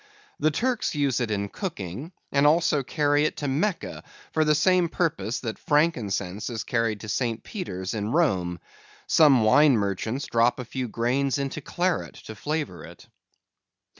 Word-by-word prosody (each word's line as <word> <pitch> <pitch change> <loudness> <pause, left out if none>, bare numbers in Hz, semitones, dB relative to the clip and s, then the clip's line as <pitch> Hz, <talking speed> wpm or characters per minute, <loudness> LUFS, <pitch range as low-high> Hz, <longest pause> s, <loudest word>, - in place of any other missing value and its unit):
The 155 - +3
Turks 240 +3 -1
use 140 -4 +1
it 120 - -1
in 100 -1 -1
cooking, 130 - -6 0.2
and 140 +1 +4
also 155 -2 +3
carry 145 +2 +1
it - - -2
to 145 - -3
Mecca, 165 +8 -2 0.3
for 160 - +3
the 150 0 +3
same 180 +2 +3
purpose 165 - -1
that 110 -3 -5
frankincense 110 - 0
is 115 -3 -4
carried 115 -3 -1
to 105 - -8
St. 115 +2 -1
Peter's 95 - -5
in 105 0 -2
Rome. 95 - +1 0.5
Some 140 -7 +5
wine 135 +4 +5
merchants 105 +6 -2
drop 115 +1 +2
a 125 - -5
few 130 +1 -4
grains 125 +4 0
into 140 +2 -3
claret, 175 +5 -1
to 110 - -7
flavor 150 +7 -4
it. - - -13
135 Hz, 160 wpm, -25 LUFS, 110-155 Hz, 0.5 s, Some